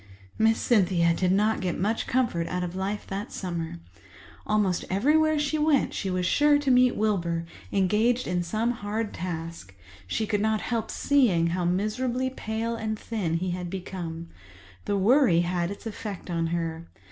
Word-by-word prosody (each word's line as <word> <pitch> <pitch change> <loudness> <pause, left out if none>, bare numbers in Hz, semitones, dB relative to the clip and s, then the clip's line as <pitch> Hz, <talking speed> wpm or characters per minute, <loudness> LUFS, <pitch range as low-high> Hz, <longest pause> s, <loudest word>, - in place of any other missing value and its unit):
Miss 225 0 +4
Cynthia 180 -7 +3
did 180 +1 +1
not 210 +3 +2
get 180 -2 -1
much 215 +5 -1
comfort 235 -10 0
out 180 0 -2
of 180 0 -4
life 195 +2 -3
that 195 +2 -5
summer. 170 - -4 0.7
Almost 205 -4 +1
everywhere 305 +10 +3
she 295 +1 0
went 300 -2 +2
she 195 - -3
was 185 -1 -1
sure 290 +8 +4
to 285 -2 +1
meet 250 0 +5
Wilbur, 170 -6 0 0.3
engaged 215 +6 +2
in 180 -1 0
some 215 +7 0
hard 215 -1 -3
task. 165 - -6 0.3
She 220 - -1
could 210 -1 0
not 220 0 +1
help 230 -2 -2
seeing 195 -13 +2
how 180 -1 -1
miserably 240 +8 0
pale 230 -1 -3
and 220 -1 -3
thin 205 -8 -2
he 180 +2 -1
had 180 0 -4
become. 170 -3 -6 0.6
The 200 - 0
worry 200 - +4
had 175 0 -1
its 200 - -8
effect 205 -4 -6
on 165 -1 0
her. 165 0 -3
200 Hz, 165 wpm, -26 LUFS, 175-230 Hz, 0.7 s, meet